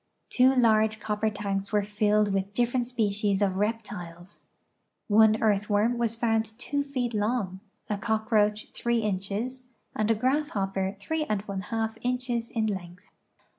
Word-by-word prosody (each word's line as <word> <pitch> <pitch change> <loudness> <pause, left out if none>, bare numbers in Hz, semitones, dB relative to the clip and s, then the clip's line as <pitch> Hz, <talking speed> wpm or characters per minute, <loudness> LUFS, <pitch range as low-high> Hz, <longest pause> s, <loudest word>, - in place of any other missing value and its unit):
Two 260 +1 +5
large 220 -3 +3
copper 210 +1 -1
tanks 200 -2 -3
were 210 -1 +2
filled 210 0 +2
with 195 +1 -1
different 245 0 +1
species 210 -4 0
of 195 -2 +1
reptiles. 200 -4 -4 0.7
One 215 +1 +5
earthworm 210 +2 +2
was 230 -1 0
found 225 -1 0
two 285 +3 -2
feet 255 -4 -2
long, 210 -3 -1 0.3
a 205 -1 -2
cockroach 215 -1 +1
three 235 -1 0
inches, 210 +6 -3 0.3
and 215 0 0
a 225 - +4
grasshopper 205 -7 0
three 315 +10 -2
and 210 -6 -1
one 200 -2 -4
half 225 +2 -3
inches 245 -2 -1
in 225 -2 -1
length. 180 -2 -6
215 Hz, 140 wpm, -27 LUFS, 200-235 Hz, 0.7 s, Two